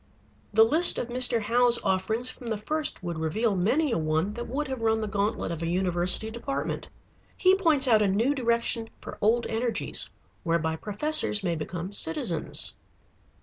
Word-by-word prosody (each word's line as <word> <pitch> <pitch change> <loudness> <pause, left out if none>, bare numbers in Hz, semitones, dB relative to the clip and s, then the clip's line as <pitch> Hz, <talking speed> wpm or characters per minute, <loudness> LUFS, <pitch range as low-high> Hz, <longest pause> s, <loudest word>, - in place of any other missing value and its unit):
The 220 +1 +5
list 320 +9 +4
of 245 - -4
Mr. 245 -1 +2
Howe's 240 +2 +3
offerings 220 +6 0
from 245 - -12
the 220 -2 -2
first 300 +1 -3
would 170 -2 -4
reveal 200 +7 -1
many 255 - +1
a 230 - 0
one 160 +5 -1
that 240 +2 -6
would 280 +4 -3
have 260 -3 -5
run 220 0 +1
the 215 - -3
gantlet 205 -2 -2
of 165 -1 -5
a 165 - -2
university 180 +4 +1
department. 235 +4 -4 0.5
He 370 -1 +4
points 320 -8 +3
out 220 -3 +4
a 210 - +2
new 225 +9 +1
direction 235 -3 0
for - - -10
old 230 +3 +2
energies, 230 +1 0 0.3
whereby 165 -1 -1
professors 210 - +2
may 175 -3 0
become 170 +4 -6
citizens. 165 -3 0
220 Hz, 170 wpm, -26 LUFS, 185-245 Hz, 0.5 s, The